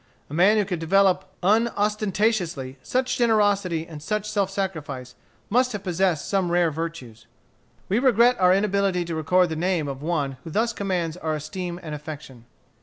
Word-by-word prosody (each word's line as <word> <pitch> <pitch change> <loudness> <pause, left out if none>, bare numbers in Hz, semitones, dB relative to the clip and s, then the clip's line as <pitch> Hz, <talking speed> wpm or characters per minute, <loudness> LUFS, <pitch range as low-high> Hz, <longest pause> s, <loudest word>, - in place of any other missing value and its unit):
A - - -7
man 190 +7 +4
who 210 - +2
could 180 -3 -3
develop, 190 +2 +3 0.2
unostentatiously, 205 - 0
such 255 +1 -1
generosity 205 -7 +2
and 155 -3 -10
such 210 +6 -2
self 200 -3 0
sacrifice, 150 -10 -4 0.3
must 250 +3 +2
have 205 -2 -5
possessed 180 -4 0
some 190 -3 0
rare 175 -2 +3
virtues. 145 -9 -6 0.6
We 205 +5 +1
regret 245 -1 +4
our 180 -1 +5
inability 195 -2 +1
to 170 - -4
record 180 +3 +2
the 160 - -3
name 170 -2 0
of 135 -1 -5
one 145 -5 -2
who - - -8
thus 225 +7 0
commands 180 -5 -2
our 160 -3 -2
esteem 175 +4 -5
and 155 -2 -6
affection. 150 -5 -9
180 Hz, 165 wpm, -24 LUFS, 160-205 Hz, 0.6 s, our